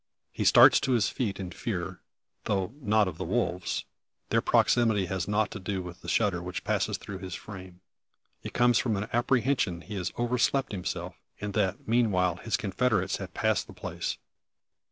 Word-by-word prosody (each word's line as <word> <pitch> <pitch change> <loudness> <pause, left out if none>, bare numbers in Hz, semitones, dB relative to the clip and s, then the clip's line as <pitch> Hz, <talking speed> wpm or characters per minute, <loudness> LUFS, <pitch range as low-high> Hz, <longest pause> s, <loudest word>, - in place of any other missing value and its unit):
He - - -3
starts - - +8
to 130 - 0
his 110 -5 +3
feet 105 -7 -2
in 90 -2 -5
fear, 95 -4 -4 0.4
though 95 +1 -1
not 105 -3 +3
of 85 -3 -6
the - - -2
wolves. 90 -2 -1 0.4
Their - - +3
proximity 110 -5 +3
has 90 -1 -3
nought 105 +1 +1
to 100 - -6
do 95 -1 -3
with 90 0 -9
the - - -11
shudder 100 -6 +1
which 90 +1 -5
passes - - 0
through 95 -2 -8
his 95 -2 -6
frame. 95 -3 -10 0.6
It - - -6
comes 120 -1 +4
from 110 -5 0
an 105 +2 -4
apprehension 120 -7 +1
he 105 - -9
has 95 -3 -2
overslept 125 +3 +1
himself, 90 -2 -4 0.3
and 105 -1 -4
that, 100 -3 -1
meanwhile, 100 -7 +2
his 115 - -1
confederates 105 -2 0
have 95 -2 -8
passed 110 -1 +1
the - - -11
place. - - -4
100 Hz, 175 wpm, -28 LUFS, 90-115 Hz, 0.6 s, starts